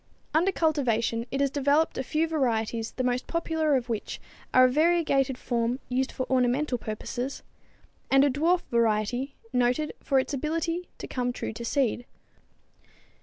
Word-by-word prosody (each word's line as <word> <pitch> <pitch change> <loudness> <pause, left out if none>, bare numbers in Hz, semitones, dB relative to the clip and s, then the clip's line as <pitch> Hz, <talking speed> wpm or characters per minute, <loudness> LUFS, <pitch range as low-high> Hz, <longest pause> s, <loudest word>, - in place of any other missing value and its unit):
Under 340 +5 +3
cultivation 240 - 0
it 275 - -2
has 280 -1 +2
developed 285 +3 +2
a 265 - -2
few 310 +5 0
varieties 230 -7 -1
the 255 - -2
most 250 0 -1
popular 320 -3 0
of 250 -2 -1
which 225 -3 -4 0.3
are 255 0 +7
a - - +6
variegated 285 -2 +2
form 235 0 -1
used 260 +1 0
for 260 - -3
ornamental 255 +1 +1
purposes, 245 +5 -5 0.7
and 270 0 +5
a 285 - +3
dwarf 335 +6 +2
variety 235 +3 +1 0.2
noted 250 +4 +1
for 275 - +1
its 265 +2 0
ability 330 +5 -2
to - - -7
come 245 -1 -1
true 245 - -5
to 230 +2 -7
seed. 245 -1 0
265 Hz, 155 wpm, -27 LUFS, 245-305 Hz, 0.7 s, are